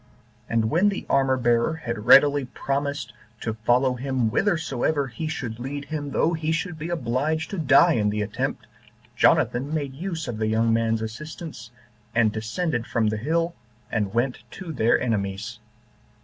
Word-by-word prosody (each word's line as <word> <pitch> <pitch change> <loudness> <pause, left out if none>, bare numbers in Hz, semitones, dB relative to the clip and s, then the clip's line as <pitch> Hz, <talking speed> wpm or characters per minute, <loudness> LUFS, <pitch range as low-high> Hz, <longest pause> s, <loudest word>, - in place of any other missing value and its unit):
And 115 -1 +1
when 185 +6 +4
the 200 - -4
armor 135 -1 +3
bearer 120 +4 +2
had 115 -9 -5
readily 145 -1 +7
promised 140 0 -3 0.3
to 110 - -2
follow 120 +4 +2
him 125 -2 -1
whithersoever 155 - +1
he 125 +7 -5
should 120 -8 -4
lead 140 +3 -5
him, 145 -2 -4
though 165 +4 +1
he 160 -1 -1
should 160 0 -2
be 160 +3 -4
obliged 155 +1 -1
to 195 - -3
die 155 +3 +5
in 105 -5 +1
the 105 0 -1
attempt, 105 - -3 0.5
Jonathan 130 +4 +3
made 145 -4 -2
use 165 +1 -4
of 115 -3 -4
the 110 - 0
young 115 +1 +2
man's 115 -1 +1
assistance, 155 +4 -7 0.5
and 115 -2 +4
descended 115 - -2
from 110 -2 +1
the 110 - -2
hill, 165 +8 0 0.4
and 105 -3 0
went 125 +2 0
to 180 +2 -7
their 120 -3 +3
enemies. 105 0 -2
130 Hz, 165 wpm, -24 LUFS, 115-155 Hz, 0.5 s, readily